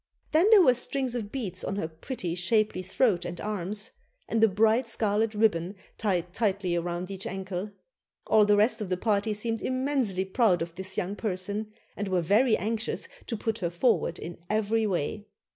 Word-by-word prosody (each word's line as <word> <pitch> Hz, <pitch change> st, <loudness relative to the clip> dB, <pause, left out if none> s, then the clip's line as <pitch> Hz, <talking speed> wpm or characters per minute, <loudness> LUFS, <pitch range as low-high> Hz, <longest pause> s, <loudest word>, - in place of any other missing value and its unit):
Then 335 Hz, +7 st, +4 dB
there 425 Hz, -4 st, +8 dB
were 255 Hz, -, +6 dB
strings 255 Hz, +1 st, 0 dB
of 220 Hz, -4 st, -4 dB
beads 195 Hz, -9 st, -4 dB
on 195 Hz, -, -2 dB
her 200 Hz, -5 st, -2 dB
pretty, 165 Hz, -, -5 dB
shapely 210 Hz, +2 st, +1 dB
throat 185 Hz, 0 st, +1 dB
and 175 Hz, 0 st, -5 dB
arms, 210 Hz, 0 st, -3 dB, 0.4 s
and 225 Hz, 0 st, +1 dB
a -, -, +8 dB
bright 220 Hz, +4 st, +3 dB
scarlet 220 Hz, -1 st, +1 dB
ribbon 200 Hz, -3 st, +1 dB, 0.2 s
tied 180 Hz, -5 st, -1 dB
tightly 195 Hz, -4 st, 0 dB
round 175 Hz, +2 st, -4 dB
each 195 Hz, -1 st, -4 dB
ankle. 190 Hz, +1 st, -4 dB, 0.6 s
All 215 Hz, -1 st, +5 dB
the 205 Hz, 0 st, +4 dB
rest 215 Hz, +2 st, +3 dB
of 205 Hz, -, -4 dB
the 185 Hz, -, 0 dB
party 210 Hz, +1 st, +1 dB
seemed 225 Hz, +1 st, -2 dB
immensely 255 Hz, -8 st, 0 dB
proud 190 Hz, -3 st, +2 dB
of 170 Hz, 0 st, -8 dB
this 190 Hz, +1 st, -7 dB
young 190 Hz, +3 st, -1 dB
person, 205 Hz, +1 st, -3 dB, 0.2 s
and 205 Hz, -, -3 dB
were 185 Hz, -1 st, +1 dB
very 215 Hz, +8 st, +3 dB
anxious 220 Hz, +3 st, -2 dB, 0.2 s
to 230 Hz, -, -2 dB
put 225 Hz, +1 st, -2 dB
her 175 Hz, -4 st, -1 dB
forward 175 Hz, -1 st, +1 dB
in 170 Hz, 0 st, -8 dB
every 215 Hz, +1 st, +1 dB
way. 200 Hz, +3 st, -2 dB
205 Hz, 180 wpm, -28 LUFS, 185-225 Hz, 0.6 s, there